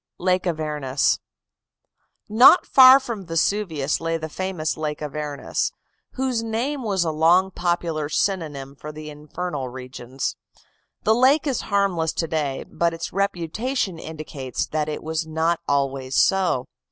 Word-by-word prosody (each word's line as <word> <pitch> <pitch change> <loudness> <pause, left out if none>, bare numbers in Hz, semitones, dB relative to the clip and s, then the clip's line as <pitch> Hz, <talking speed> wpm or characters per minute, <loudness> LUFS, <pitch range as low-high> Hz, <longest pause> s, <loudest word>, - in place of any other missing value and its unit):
LAKE 185 0 +1
AVERNUS 150 -5 0 1.1
Not 240 - +7
far 260 0 +8
from 235 -7 -6
Vesuvius 165 -4 0
lay 165 0 -1
the 160 0 -6
famous 180 -2 -2
Lake 150 -1 -3
Avernus, 150 -1 -3 0.4
whose 255 -3 -1
name 235 +6 -2
was 195 -6 0
long 165 +4 +3
a - - -23
popular 170 -4 -1
synonym 150 -7 -2
for 150 +2 -8
the 155 0 -8
infernal 150 -2 -5
regions. 130 0 -5 0.7
The 220 - +4
lake 260 +6 +4
is 270 -5 0
harmless 190 -6 0
to 165 - -2
day, 150 -4 -2
but 170 -1 0
its 165 - -6
reputation 195 - -1
indicates 150 -5 -5
that 155 0 -2
it 150 - -5
was 160 +1 -2
not 160 +2 0
always 135 -2 0
so. 185 -10 +2
165 Hz, 135 wpm, -23 LUFS, 150-195 Hz, 1.1 s, far